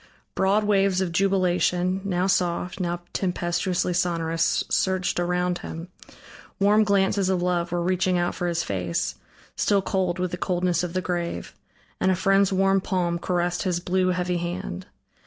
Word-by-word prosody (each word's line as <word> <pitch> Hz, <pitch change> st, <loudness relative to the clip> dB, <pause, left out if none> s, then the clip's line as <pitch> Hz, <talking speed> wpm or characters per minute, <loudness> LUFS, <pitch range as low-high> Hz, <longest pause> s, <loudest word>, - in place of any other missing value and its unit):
Broad 195 Hz, +3 st, +2 dB
waves 195 Hz, -2 st, +2 dB
of 185 Hz, -2 st, -1 dB
jubilation, 185 Hz, 0 st, +1 dB
now 185 Hz, -2 st, 0 dB
soft, 180 Hz, 0 st, 0 dB
now 175 Hz, -1 st, -2 dB
tempestuously 180 Hz, 0 st, -1 dB
sonorous 165 Hz, -2 st, +1 dB
surged 185 Hz, -1 st, 0 dB
around 180 Hz, 0 st, 0 dB
him; 165 Hz, +2 st, -7 dB, 0.7 s
warm 205 Hz, +2 st, +5 dB
glances 200 Hz, -1 st, +2 dB
of 180 Hz, -2 st, +1 dB
love 175 Hz, -1 st, 0 dB
were 175 Hz, -1 st, 0 dB
reaching 185 Hz, 0 st, +1 dB
out 175 Hz, 0 st, 0 dB
for 175 Hz, -, -3 dB
his 170 Hz, -1 st, 0 dB
face, 90 Hz, -3 st, -2 dB, 0.4 s
still 200 Hz, -2 st, +2 dB
cold 185 Hz, -3 st, 0 dB
with 180 Hz, -1 st, -2 dB
the 180 Hz, -, -3 dB
coldness 180 Hz, -1 st, 0 dB
of 180 Hz, -1 st, -4 dB
the 185 Hz, -, 0 dB
grave; 175 Hz, -, -3 dB, 0.5 s
and -, -, +2 dB
a 185 Hz, -, +3 dB
friend's 195 Hz, +1 st, +3 dB
warm 195 Hz, 0 st, +3 dB
palm 175 Hz, -3 st, -1 dB
caressed 175 Hz, 0 st, -1 dB
his 180 Hz, -3 st, 0 dB
blue, 185 Hz, +1 st, 0 dB
heavy 180 Hz, -1 st, 0 dB
hand. 175 Hz, -, -5 dB
180 Hz, 155 wpm, -25 LUFS, 175-190 Hz, 0.7 s, warm